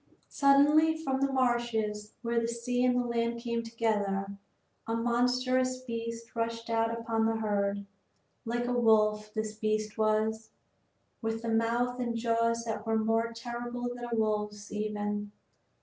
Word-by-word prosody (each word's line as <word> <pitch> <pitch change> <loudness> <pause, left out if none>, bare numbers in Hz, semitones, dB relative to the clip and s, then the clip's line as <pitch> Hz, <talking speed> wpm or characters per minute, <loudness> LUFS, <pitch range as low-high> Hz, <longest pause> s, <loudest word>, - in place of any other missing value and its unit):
Suddenly, 295 +3 +5
from 270 -4 -1
the 275 0 +2
marshes 235 -5 0
where 235 0 +1
the 230 - -1
sea 240 +1 -1
and 250 -1 +2
land 235 0 0
came 235 -1 -2
together, 205 -4 -1 0.5
a 225 - 0
monstrous 250 +2 +1
beast 230 -1 -5
rushed 230 0 -2
out 225 0 +2
upon 230 -1 0
the 225 - +1
herd; 200 -2 0 0.6
like 240 +1 -1
a 245 - 0
wolf 215 -3 +3
this 215 0 -2
beast 215 0 -2
was, 220 +1 +1 0.7
but 225 0 0
with 225 +1 -6
mouth 235 +2 +1
and 240 -2 -1
jaws 230 0 +1
that 220 -2 -3
were 225 0 +2
more 225 +1 +1
terrible 240 +1 -4
than 245 0 -6
a - - +1
wolf's 210 -1 -1
even. 210 -1 -2
230 Hz, 145 wpm, -30 LUFS, 215-240 Hz, 0.7 s, Suddenly